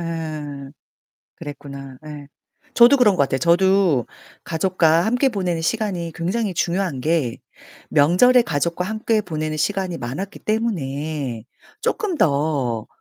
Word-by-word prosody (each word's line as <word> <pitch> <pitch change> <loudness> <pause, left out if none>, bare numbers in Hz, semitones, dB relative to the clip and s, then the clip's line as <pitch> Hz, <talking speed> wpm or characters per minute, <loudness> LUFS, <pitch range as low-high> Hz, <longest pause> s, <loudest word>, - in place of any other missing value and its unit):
예. 155 -4 -5 0.7
그랬구나 140 -2 -9
예. 145 -2 -9 0.5
저도 240 +4 +7
그런 215 -7 +4
것 145 - +3
같아요. 135 -1 -1
저도 175 - +3 0.4
가족과 165 0 +2
함께 245 +4 +2
보내는 180 -7 -2
시간이 175 -3 -2
굉장히 190 +4 -2
중요한 170 -5 -1
게 150 -5 0 0.5
명절에 180 - +5
가족과 170 +1 -1
함께 220 +1 0
보내는 155 -4 -4
시간이 190 0 -1
많았기 140 +12 -6
때문에 150 - -2 0.4
쪼끔 410 -5 -1
더 140 -7 0
165 Hz, 265 characters per minute, -21 LUFS, 145-195 Hz, 0.7 s, 저도